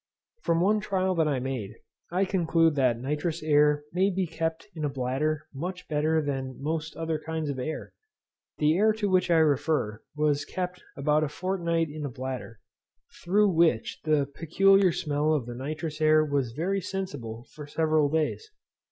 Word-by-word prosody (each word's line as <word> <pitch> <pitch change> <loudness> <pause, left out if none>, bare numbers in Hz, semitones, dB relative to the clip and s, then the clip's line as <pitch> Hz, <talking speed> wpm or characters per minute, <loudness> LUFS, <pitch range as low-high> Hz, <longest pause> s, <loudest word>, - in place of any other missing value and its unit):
From 165 0 +1
one 210 +4 +3
trial 190 -2 0
that 165 -3 +2
I 145 -3 +1
made, 125 -5 -4 0.3
I 185 +3 +1
conclude 165 -4 +2
that 130 -5 +2
nitrous 150 +5 -2
air 150 -1 +4
may 190 +3 +3
be 190 -1 0
kept 165 +1 -3
in 155 - -6
a 145 - +1
bladder 140 +4 -1
much 180 +6 -5
better 155 +1 +1
than 135 -2 -3
most 155 +2 -3
other 160 -1 -2
kinds 160 -2 -3
of 130 - -5
air. 155 +5 -5 0.6
The 155 +1 +3
air 215 +4 +4
to 210 -2 -1
which 185 -1 +3
I 170 - +5
refer 145 -7 +1
was 150 -1 +1
kept 180 0 -4 0.2
about 150 +2 +2
a 150 - -1
fortnight 170 -2 -1
in 150 0 -6
a 145 - -2
bladder, 125 -3 -6 0.6
through 205 +4 +4
which 160 -10 +2
the 150 -3 +2
peculiar 195 +4 +4
smell 150 0 0
of 135 -6 -1
the 120 - -6
nitrous 155 +5 -5
air 155 0 +5
was 140 -5 -1
very 190 +8 -1
sensible 140 -12 -5
for 150 -1 -9
several 155 -1 +2
days. 160 - -1
155 Hz, 170 wpm, -27 LUFS, 145-175 Hz, 0.6 s, I